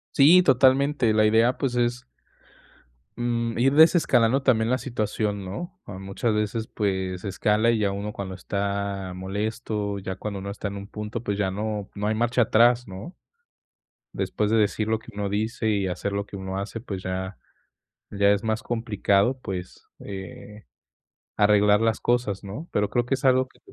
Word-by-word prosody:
Sí, 165 +6 +7
totalmente, 135 -2 +4
la 110 0 +4
idea, 115 +3 +3
pues, 135 -4 -1
es 120 +1 0 1.1
mm, 115 -1 -1
ir 135 +3 +3
desescalando 140 -6 +5
también 115 -4 +2
la 130 - +2
situación, 105 -5 -2
¿no? 175 - -7
Ah, 95 -2 -8
muchas 100 +4 -2
veces, 105 +1 -1
pues, 95 -3 -2
escala 105 +3 +1
y 115 - +1
ya 100 -2 +1
uno 100 +2 -4
cuando 95 -2 -6
está 100 0 -3
molesto, 105 +1 -3
ya 95 0 -5
cuando 100 +1 -5
uno 100 +1 -6
está 100 0 -5
en 100 0 -5
un 100 0 -8
punto, 105 +1 -5
pues, 100 -2 -2
ya 95 -2 0
no 105 0 -3
no 105 +1 -2
hay 110 - +1
marcha 120 +2 +2
atrás, 120 +2 +4
¿no? 95 - -8 1.0
Después 105 0 -1
de 115 - +4
decir 105 +1 +1
lo 110 0 +1
que 115 - -14
uno 100 0 -3
dice 110 +3 -2
y 100 -2 +1
hacer 95 +2 -3
lo 100 0 -2
que - - -9
uno 95 0 -4
hace, 105 +3 -5
pues, 100 -5 -6
ya 95 +1 -4 0.7
ya 100 0 +3
es 100 +1 +1
más 110 0 -1
complicado, 115 0 +1
pues, 95 -5 -7
eh, 100 +2 -9 0.7
arreglar 105 0 +4
las 115 -1 +1
cosas, 120 -5 0
¿no? 105 - -7
Pero 105 -1 0
creo 120 +2 0
que 120 - -1
es 135 - -9
algo 130 0 +4
que - - -26
105 Hz, 175 wpm, -25 LUFS, 100-120 Hz, 1.1 s, Sí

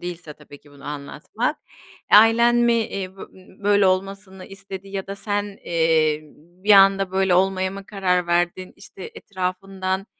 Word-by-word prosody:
değilse 175 -3 -7
tabii 145 -1 -15
ki 145 - -21
bunu 140 -1 -17
anlatmak, 150 - -4 0.5
ailen 230 +3 +6
mi, 240 0 +3
eee, 195 -4 -3
bö - - -10
ö - - -10 0.4
böyle 205 -1 +4
olmasını 190 0 -3
istedi 195 0 -10
ya 195 -1 -5
da 195 0 -7
sen, 205 0 -2 0.2
eee, 160 -2 +1 0.4
bir 210 - +5
anda 195 -1 +5
böyle 190 -1 +1
olmaya 190 0 +1
mı 195 0 -10
karar 180 -3 -1
verdin? 175 +2 -1
İşte, 190 - -11
etrafından 190 0 -4
190 Hz, 155 wpm, -22 LUFS, 180-200 Hz, 0.5 s, ailen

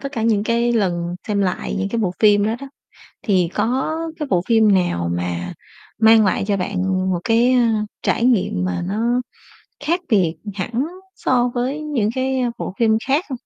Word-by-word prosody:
tất 275 +1 -6
cả 225 - -3
những 215 -2 +2
cái 235 +1 +1
lần 175 -5 0
xem 205 -1 0
lại 185 -1 -2
những 195 +1 -1
cái 235 - -2
bộ 185 -4 0
phim 205 -1 +5
đó 220 - 0
đó 275 - -7 0.6
thì 185 -5 +2
có 255 +8 0 0.2
cái 300 - -3
bộ 175 -2 +3
phim 220 -3 +4
nào 85 - +1
mà 90 0 -3 0.5
mang 220 -1 +6
lại 190 +1 +1
cho 200 -1 +1
bạn 190 +1 -3 0.3
một 175 - 0
cái, 235 +3 +3
ơ, 250 - +4 0.4
trải 230 - +1
nghiệm 185 - +1
mà 90 -1 -2
nó 235 +5 0 0.6
khác 340 +4 +1
biệt 185 -8 +2 0.2
hẳn 235 +8 -2 0.3
so 245 -1 +1
với 260 +5 -2
những 280 -9 -1
cái, 260 0 0
ơ, 245 - 0
bộ 185 - -5
phim 230 -2 +3 0.2
khác 285 +7 +2
không? 265 - -4
220 Hz, 190 wpm, -20 LUFS, 190-245 Hz, 0.6 s, mang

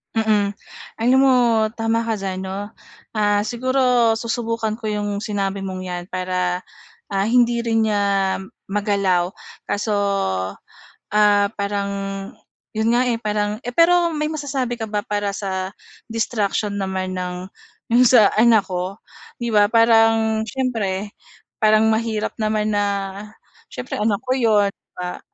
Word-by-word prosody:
Mm, 210 -2 +1 0.5
alam 250 +3 +4
mo 270 -1 +5 0.4
tama 225 0 0
ka 225 - +1
diyan, 195 -2 -4
'no? 200 +2 -5 0.4
Ah, 205 -1 +2
siguro 245 0 +2
susubukan 230 -1 -2
ko 220 - -5
'yong 205 -1 -2
sinabi 200 -2 -2
mong 190 -1 -5
'yan 180 -1 -4
para, 180 -1 -2 0.4
ah, 195 0 -1
hindi 240 0 +3
rin 225 -1 +1
niya 205 -1 +1 0.6
magalaw, 195 -3 +1 0.4
kaso, 210 +1 -1 1.2
ah, 205 -1 +4
parang 200 0 -2 0.9
'yon 220 +1 +2
nga, 245 - +3
eh 235 - 0
parang 210 -1 -1
eh, 245 - -4
pero 340 +2 +4
may 300 0 -1
masasabi 275 -5 -3
ka 225 - -3
ba 210 -1 -2
para 205 -1 -2
sa 190 -1 -3 0.3
distraction 215 -2 -1
naman 190 -1 -3
ng 180 0 -5 0.4
'yong 240 +2 +5
sa 230 -4 +6
anak 220 -3 +4
ko? 180 +1 -3 0.5
'Di 235 - -1
ba, 210 -1 +5
parang 225 -1 +4
siyempre 215 -6 -2 0.5
parang 215 0 +4
mahirap 220 -1 -1
naman 215 0 0
na 205 -1 +1 0.9
siyempre 250 - -5
anak 210 -1 +1
ko 255 - -3
'yon, 210 -4 +3 0.2
ba? 180 0 -5
215 Hz, 135 wpm, -21 LUFS, 200-230 Hz, 1.2 s, sa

